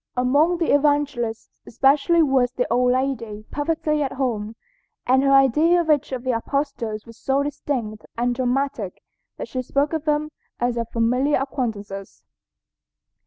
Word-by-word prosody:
Among 285 Hz, +8 st, +3 dB
the 335 Hz, -, +1 dB
Evangelists 285 Hz, -6 st, 0 dB, 0.2 s
especially 285 Hz, +7 st, +3 dB
was 265 Hz, -4 st, +2 dB
the 250 Hz, -1 st, 0 dB
old 250 Hz, +1 st, +3 dB
lady 235 Hz, -5 st, -2 dB
perfectly 305 Hz, 0 st, -1 dB
at 270 Hz, -2 st, -1 dB
home, 230 Hz, -5 st, -2 dB, 0.5 s
and 260 Hz, +1 st, +4 dB
her 275 Hz, 0 st, +2 dB
idea 285 Hz, +6 st, +5 dB
of 325 Hz, -2 st, +1 dB
each 295 Hz, -1 st, +1 dB
of 255 Hz, -2 st, -4 dB
the 260 Hz, -, 0 dB
apostles 230 Hz, -3 st, -2 dB
was 230 Hz, -1 st, -14 dB
so 275 Hz, +1 st, +1 dB
distinct 245 Hz, -7 st, -4 dB
and 245 Hz, +1 st, +1 dB
dramatic 250 Hz, -5 st, -2 dB, 0.3 s
that -, -, -5 dB
she 255 Hz, -, -3 dB
spoke 280 Hz, +4 st, 0 dB
of 315 Hz, -1 st, -2 dB
them 305 Hz, 0 st, 0 dB, 0.3 s
as 245 Hz, 0 st, 0 dB
of 230 Hz, -1 st, -3 dB
familiar 250 Hz, +5 st, +1 dB
acquaintances. 215 Hz, -8 st, -5 dB
265 Hz, 150 wpm, -22 LUFS, 235-290 Hz, 0.5 s, idea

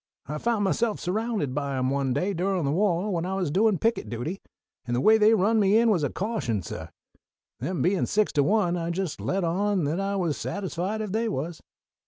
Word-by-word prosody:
I 150 Hz, +2 st, -4 dB
found 230 Hz, 0 st, 0 dB
myself 215 Hz, +3 st, 0 dB
surrounded 205 Hz, -, -1 dB
by 140 Hz, -1 st, -2 dB
'em 130 Hz, 0 st, 0 dB
one 140 Hz, -1 st, 0 dB
day 185 Hz, +10 st, 0 dB
durin' 185 Hz, -1 st, 0 dB
the 140 Hz, -, +1 dB
wah 185 Hz, +2 st, +1 dB
when 170 Hz, -4 st, -1 dB
I 190 Hz, +2 st, -2 dB
was 180 Hz, -6 st, -1 dB
doin' 205 Hz, +3 st, +3 dB
picket 225 Hz, -, 0 dB
duty, 125 Hz, -, -4 dB, 0.5 s
and 120 Hz, -, 0 dB
the -, -, +1 dB
way 220 Hz, +10 st, +5 dB
they 215 Hz, +1 st, +6 dB
run 220 Hz, +3 st, +3 dB
me 200 Hz, +1 st, +4 dB
in 230 Hz, 0 st, +4 dB
was 175 Hz, -7 st, +1 dB
a 145 Hz, -, +1 dB
caution, 185 Hz, -, -2 dB
suh. -, -, -6 dB, 0.7 s
They -, -, -3 dB
bein' 185 Hz, +1 st, +1 dB
six 215 Hz, 0 st, +1 dB
to 145 Hz, -, +2 dB
one, 180 Hz, +1 st, +2 dB
I 170 Hz, 0 st, -3 dB
just 175 Hz, -2 st, -3 dB
let 195 Hz, 0 st, -1 dB
on 190 Hz, +2 st, +1 dB
that 150 Hz, +5 st, -1 dB
I 195 Hz, 0 st, -1 dB
was 170 Hz, -6 st, -1 dB
satisfied 195 Hz, +2 st, -3 dB
if 210 Hz, -3 st, -4 dB
they 225 Hz, +2 st, 0 dB
was." 160 Hz, -1 st, -4 dB
185 Hz, 220 wpm, -26 LUFS, 155-210 Hz, 0.7 s, they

